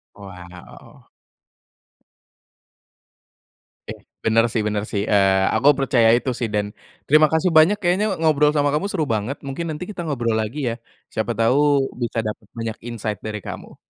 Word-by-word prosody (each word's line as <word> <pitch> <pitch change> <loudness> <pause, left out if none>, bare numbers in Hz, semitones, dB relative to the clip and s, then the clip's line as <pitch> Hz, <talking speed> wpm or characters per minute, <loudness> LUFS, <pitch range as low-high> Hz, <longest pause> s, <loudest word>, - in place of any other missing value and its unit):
Wow. 90 -3 -13 2.8
Oke, - - -4 0.3
benar 115 +1 +3
sih 110 - 0
benar 105 -1 -1
sih, 100 - 0
eee, 95 -1 +4 0.2
aku 140 - +3
percaya 130 -4 +3
itu 130 +2 -2
sih, 115 - -1
dan 105 -1 0 0.4
terima 155 +1 +6
kasih 160 +3 +2
banyak, 175 +7 +5
kayaknya 185 +3 +1
ngobrol 150 -2 +3
sama 145 0 +2
kamu 155 +7 0
seru 180 -6 -1
banget, 110 +6 -3
mungkin 140 +5 -4
nanti 155 +4 -5
kita 200 - -7
ngobrol 120 -5 -1
lagi 110 +7 -4
ya. 115 - -2 0.4
Siapa 110 +2 -2
tahu, 115 +5 +3 0.4
bisa 120 -1 -2
dapat 105 0 -7
banyak 115 -1 -4
insight 110 -3 -4
dari 105 -1 -4
kamu. - - -9
120 Hz, 150 wpm, -21 LUFS, 105-150 Hz, 2.8 s, terima